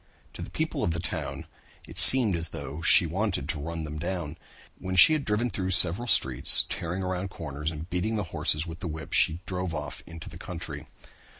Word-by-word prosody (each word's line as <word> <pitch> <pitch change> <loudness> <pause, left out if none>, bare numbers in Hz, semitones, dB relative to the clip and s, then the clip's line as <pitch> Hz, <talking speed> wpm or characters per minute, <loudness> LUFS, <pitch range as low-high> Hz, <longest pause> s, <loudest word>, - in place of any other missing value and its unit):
To - - -10
the - - -7
people - - -3
of 85 - 0
the - - -4
town 85 - -5 0.4
it 80 - -12
seemed 105 +2 +7
as 85 0 +4
though 70 +4 -8
she 85 +3 +6
wanted 90 -4 -3
to 80 - -3
run 80 +2 -5
them 75 0 -7
down. 85 -3 -4 0.4
When 95 0 -5
she 95 - +8
had 155 -2 -1
driven 110 +2 -1
through 95 -1 -3
several 95 +5 +1
streets, 65 - +3
tearing 90 +3 -4
around 95 +1 -3
corners 75 -3 -5
and 80 0 -8
beating 95 +5 -2
the 105 - -2
horses 75 +2 +1
with 85 0 -9
the - - -6
whip, 80 -2 -7
she 80 +3 +2
drove 90 -2 -4
off 75 0 -6
into 85 -1 -10
the - - -11
country. - - -8
85 Hz, 205 wpm, -26 LUFS, 80-95 Hz, 0.4 s, she